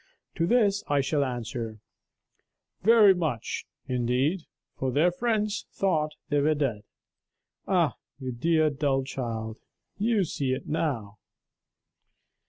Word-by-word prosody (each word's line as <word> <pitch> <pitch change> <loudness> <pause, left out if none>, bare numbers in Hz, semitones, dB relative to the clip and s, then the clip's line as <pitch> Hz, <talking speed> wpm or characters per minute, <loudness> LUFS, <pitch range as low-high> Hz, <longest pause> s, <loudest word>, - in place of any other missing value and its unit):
To 165 - 0
this 210 -3 +3
I 145 -1 +2
shall 140 +1 +1
answer: 120 -3 -4 1.0
'Very 215 -1 +7
much, 155 - -3 0.2
indeed, 130 +8 0 0.3
for 130 -1 -1
their 155 +7 +3
friends 215 +1 -1
thought 155 -6 0
they 145 - +2
were 155 +2 +3
dead.' 125 -8 -1 0.8
Ah, - - +2 0.2
you 130 -2 -4
dear 155 +5 +2
dull 135 -1 0
child, 115 -4 -4 0.4
you 215 -1 +2
see 140 -5 -1
it - - -4
now!" 120 -10 -2
145 Hz, 115 wpm, -27 LUFS, 125-180 Hz, 1.0 s, Very